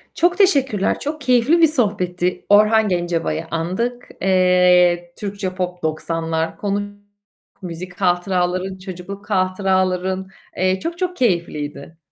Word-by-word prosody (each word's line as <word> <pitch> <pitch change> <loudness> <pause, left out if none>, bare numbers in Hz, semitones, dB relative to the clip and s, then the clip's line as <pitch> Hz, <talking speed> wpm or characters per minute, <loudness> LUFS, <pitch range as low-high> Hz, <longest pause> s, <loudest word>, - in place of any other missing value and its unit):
Çok 350 +1 +2
teşekkürler. 270 - +2
Çok 305 +1 -4
keyifli 255 +6 +3
bir 325 - +8
sohbetti; 185 - -1
Orhan 215 +1 +5
Gencabay'ı 175 -2 -1
andık. 210 +10 -2
Eee, 180 -2 +3
Türkçe 200 -2 -4
Pop 180 -1 -4
90'lar 165 +1 -2
konuş 205 +2 -1 0.8
müzik 180 +1 -8
hatıraların, 180 +1 0
çocukluk 185 +2 -9
hatıraların. 185 -1 0 0.3
Eee, 185 +1 +1
çok 335 - -4
çok 360 0 -2
keyifliydi. 165 - -2
185 Hz, 110 wpm, -20 LUFS, 175-210 Hz, 0.8 s, bir